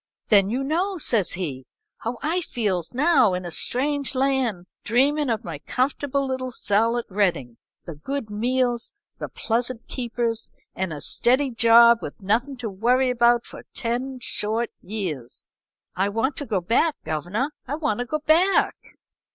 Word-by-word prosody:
"'Then 200 Hz, -2 st, +5 dB
you 255 Hz, +5 st, -1 dB
know, 360 Hz, +7 st, -1 dB
says 230 Hz, -, +1 dB
he, 140 Hz, -8 st, -5 dB, 0.3 s
'how 235 Hz, +2 st, -4 dB
I 335 Hz, +5 st, 0 dB
feels 205 Hz, -, -2 dB
now 260 Hz, -, +3 dB
in 180 Hz, 0 st, -5 dB
a 175 Hz, -, -5 dB
strange 280 Hz, -, +2 dB
land, 255 Hz, -8 st, 0 dB, 0.2 s
dreamin' 275 Hz, +5 st, +2 dB
of 225 Hz, -2 st, -1 dB
my 165 Hz, -4 st, -6 dB
comfortable 275 Hz, -, -1 dB
little 260 Hz, -1 st, -3 dB
cell 225 Hz, +1 st, +1 dB
at 240 Hz, -, -3 dB
Reading; 175 Hz, -, -1 dB, 0.3 s
the 170 Hz, -, -6 dB
good 270 Hz, -, -4 dB
meals, 245 Hz, -, 0 dB, 0.2 s
the -, -, -5 dB
pleasant 235 Hz, +1 st, -2 dB
keepers, 235 Hz, -2 st, -2 dB, 0.2 s
and 190 Hz, -2 st, -3 dB
a 150 Hz, -2 st, -6 dB
steady 260 Hz, +3 st, +2 dB
job 235 Hz, 0 st, +6 dB
with -, -, -7 dB
nothin' 235 Hz, +8 st, 0 dB
to 245 Hz, -, -4 dB
worry 245 Hz, +6 st, +2 dB
about 240 Hz, -1 st, +3 dB
for -, -, -10 dB
ten 255 Hz, +2 st, -2 dB
short 225 Hz, 0 st, -1 dB
years. 170 Hz, -, -6 dB, 0.4 s
I 195 Hz, +2 st, +1 dB
want 230 Hz, +7 st, -1 dB
to 285 Hz, -, -3 dB
go 200 Hz, -5 st, 0 dB
back, 250 Hz, -, +2 dB
governor 180 Hz, -, -2 dB, 0.2 s
I 280 Hz, -, -2 dB
want 295 Hz, -9 st, -1 dB
to 245 Hz, -, -3 dB
go 305 Hz, -, -1 dB
back!' 350 Hz, +5 st, +2 dB
235 Hz, 160 wpm, -24 LUFS, 205-265 Hz, 0.4 s, job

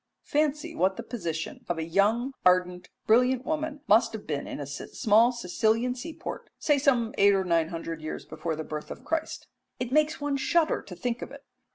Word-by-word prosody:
Fancy 305 Hz, +2 st, 0 dB
what 190 Hz, -9 st, +1 dB
the -, -, -5 dB
position 165 Hz, -9 st, -5 dB
of 175 Hz, -, 0 dB
a 160 Hz, -, -2 dB
young, 210 Hz, +10 st, +1 dB
ardent, 180 Hz, 0 st, +2 dB, 0.2 s
brilliant 250 Hz, +3 st, +3 dB
woman 310 Hz, -1 st, -2 dB
must 220 Hz, +3 st, +4 dB
have 220 Hz, -, -7 dB
been 145 Hz, -2 st, -3 dB
in -, -, -6 dB
a 145 Hz, -, -4 dB
small 215 Hz, -, +2 dB
Sicilian 230 Hz, +2 st, 0 dB
sea 255 Hz, +6 st, -7 dB
port, -, -, -7 dB
say 295 Hz, -2 st, +2 dB
some 245 Hz, -5 st, +2 dB
eight 200 Hz, 0 st, +6 dB
or 190 Hz, -, +1 dB
nine 170 Hz, -3 st, +2 dB
hundred 165 Hz, -1 st, -5 dB
years 155 Hz, -, -6 dB
before 165 Hz, -2 st, -4 dB
the 160 Hz, -, -4 dB
birth 150 Hz, -1 st, -6 dB
of -, -, -9 dB
Christ. 325 Hz, -1 st, -2 dB, 0.3 s
It 250 Hz, -1 st, -3 dB
makes 305 Hz, +2 st, +2 dB
one 290 Hz, -1 st, -1 dB
shudder 320 Hz, +4 st, +2 dB
to 185 Hz, -, -10 dB
think 240 Hz, +5 st, -3 dB
of -, -, -5 dB
it. 280 Hz, +1 st, -12 dB
225 Hz, 200 wpm, -27 LUFS, 180-275 Hz, 0.3 s, eight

